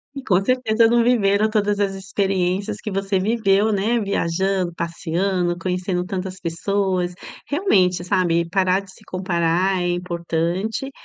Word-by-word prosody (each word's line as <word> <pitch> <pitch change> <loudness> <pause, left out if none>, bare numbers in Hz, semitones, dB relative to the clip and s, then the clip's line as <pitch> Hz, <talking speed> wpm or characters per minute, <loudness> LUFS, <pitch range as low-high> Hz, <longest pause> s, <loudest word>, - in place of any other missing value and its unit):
E 275 - -6
com 190 -4 +2
certeza 230 -1 +3
não 235 +1 +3
viveram 215 -3 +3
todas 205 -1 +1
as 200 -1 +1
experiências 195 +1 -1
que - - -4
você 195 0 0
viveu, 210 0 +2
né, 215 +4 +1
viajando, 190 -2 -1
passeando, 175 +2 -1
conhecendo 180 0 -2
tantas 185 0 -5
pessoas, 180 +1 -1 0.3
realmente, 185 - +2
sabe, 175 -1 +1
e 170 0 -3
parar 185 0 +2
de 195 -1 -15
se - - -18
comparar 185 0 0
é 175 - 0
importante, 175 +6 -2
190 Hz, 140 wpm, -21 LUFS, 180-205 Hz, 0.3 s, certeza